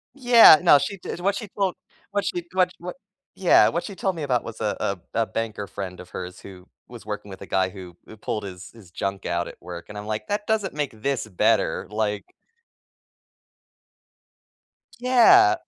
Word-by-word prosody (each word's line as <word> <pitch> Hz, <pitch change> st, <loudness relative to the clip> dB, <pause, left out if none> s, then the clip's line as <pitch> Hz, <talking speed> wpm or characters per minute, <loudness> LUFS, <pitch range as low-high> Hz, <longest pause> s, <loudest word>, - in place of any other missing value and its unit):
Yeah, 245 Hz, -, +8 dB
no 145 Hz, -, +7 dB
she 200 Hz, -, -3 dB
did 175 Hz, -, -7 dB
what 195 Hz, +3 st, 0 dB
she 215 Hz, +1 st, -5 dB
told 195 Hz, -3 st, -2 dB, 0.4 s
what 200 Hz, -1 st, -1 dB
she 175 Hz, -, -2 dB
w 185 Hz, -1 st, +3 dB
what 180 Hz, +1 st, -7 dB, 0.4 s
yeah, -, -, +5 dB
what -, -, -2 dB
she 200 Hz, -, -7 dB
told 190 Hz, 0 st, -2 dB
me 160 Hz, -, -5 dB
about 125 Hz, -4 st, 0 dB
was, 115 Hz, -1 st, -9 dB
uh 105 Hz, -2 st, -1 dB
uh, 100 Hz, -, -1 dB, 0.2 s
a 115 Hz, -, +1 dB
banker 110 Hz, -3 st, -4 dB
friend 95 Hz, -3 st, -7 dB
of 90 Hz, -, -11 dB
hers 90 Hz, +1 st, -7 dB
who 95 Hz, -1 st, -13 dB, 0.2 s
was 120 Hz, -3 st, -12 dB
working 105 Hz, -1 st, -6 dB
with 95 Hz, -, -10 dB
a -, -, -7 dB
guy 95 Hz, -1 st, 0 dB
who 90 Hz, -2 st, -11 dB
who 110 Hz, -, -13 dB
pulled 105 Hz, 0 st, -4 dB
his 90 Hz, -1 st, -9 dB
his 110 Hz, -6 st, -16 dB
junk 95 Hz, 0 st, -4 dB
out 85 Hz, 0 st, -1 dB
at -, -, -11 dB
work, 85 Hz, -1 st, -8 dB
and 105 Hz, -, -8 dB
I'm 105 Hz, 0 st, -7 dB
like, 110 Hz, 0 st, -4 dB
"That 205 Hz, +1 st, -3 dB
doesn't 210 Hz, -6 st, 0 dB
make 140 Hz, -7 st, -4 dB
this 135 Hz, -5 st, -1 dB
better," 95 Hz, -5 st, +1 dB
like 105 Hz, -1 st, -2 dB, 2.7 s
Yeah. 245 Hz, -, +6 dB
110 Hz, 190 wpm, -24 LUFS, -, 2.7 s, Yeah